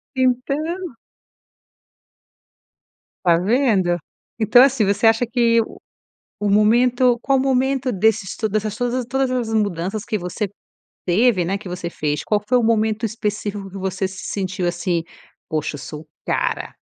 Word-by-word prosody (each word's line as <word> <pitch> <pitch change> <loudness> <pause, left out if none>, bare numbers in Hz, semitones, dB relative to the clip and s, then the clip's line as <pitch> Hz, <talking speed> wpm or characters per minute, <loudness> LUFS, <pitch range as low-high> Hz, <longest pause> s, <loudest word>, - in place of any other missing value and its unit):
Então. 275 +6 -1 2.3
Tá 170 -2 +5
vendo? 195 -3 +2 0.4
Então 225 +3 +6
assim, 265 -5 +3
você 200 +3 +2
acha 225 +2 +4
que 230 -1 +3 0.8
o 205 -1 0
momento 240 +4 +4
qual 270 0 +2
o - - +1
momento 265 -1 +1
desses 200 -1 +1
to 220 - -2
dessas 215 0 -1
to 245 +1 -1
todas 265 0 0
as 235 -3 -1
mudanças 200 -1 -1
que 215 - -1
você 180 +3 -3 0.6
teve, 190 +1 +3
né, 195 +3 -1
que 200 -2 -11
você 175 -1 -4
fez. 150 -3 -2
Qual 210 - +1
que 210 - -26
foi 250 - +4
o 240 - +1
momento 220 0 +1
específico 210 -2 -3
que 195 - -9
você 190 0 -2
se 190 0 -9
sentiu, 185 -2 -2
assim, 175 -1 -1 0.5
poxa, 155 -1 -2
eu 145 - -8
sou 150 +2 -9 0.2
cara. - - -1
215 Hz, 150 wpm, -21 LUFS, 190-245 Hz, 2.3 s, Então